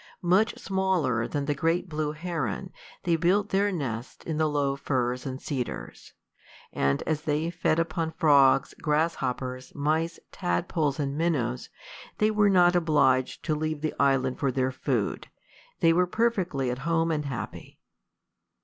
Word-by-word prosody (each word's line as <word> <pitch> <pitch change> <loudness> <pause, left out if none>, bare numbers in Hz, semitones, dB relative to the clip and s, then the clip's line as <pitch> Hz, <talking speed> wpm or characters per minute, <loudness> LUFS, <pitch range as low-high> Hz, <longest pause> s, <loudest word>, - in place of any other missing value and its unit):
Much 190 +6 +3
smaller 185 - 0
than 145 -2 -2
the 145 - +1
great 165 +5 0
blue 155 -2 -2
heron, 155 - -4 0.3
they 170 -2 +2
built 190 +5 +2
their 200 +1 +2
nests 125 - -5
in 160 -2 -2
the 155 0 +2
low 140 -2 0
firs 125 -1 -1
and 130 0 -5
cedars; 130 -5 -5 0.6
and 70 0 +1
as 155 -2 -1
they 155 +2 -1
fed 165 -2 +1
upon 165 0 -1
frogs, 140 -4 +5
grasshoppers, 130 -5 -1
mice, 160 +3 0
tadpoles, 140 - -1
and 140 -1 -1
minnows, 140 -7 -1 0.5
they 215 +1 +3
were 210 -1 +3
not 180 -2 +5
obliged 140 -6 +2
to 155 - +1
leave 155 0 -2
the 155 - -1
island 135 -2 +2
for 135 -2 +1
their 130 0 0
food: 130 - -2 0.5
they 165 -2 +5
were 180 +1 +3
perfectly 180 - 0
at 125 - -4
home 165 +2 +1
and 150 -2 -1
happy. 130 -4 -6
150 Hz, 150 wpm, -27 LUFS, 135-170 Hz, 0.6 s, frogs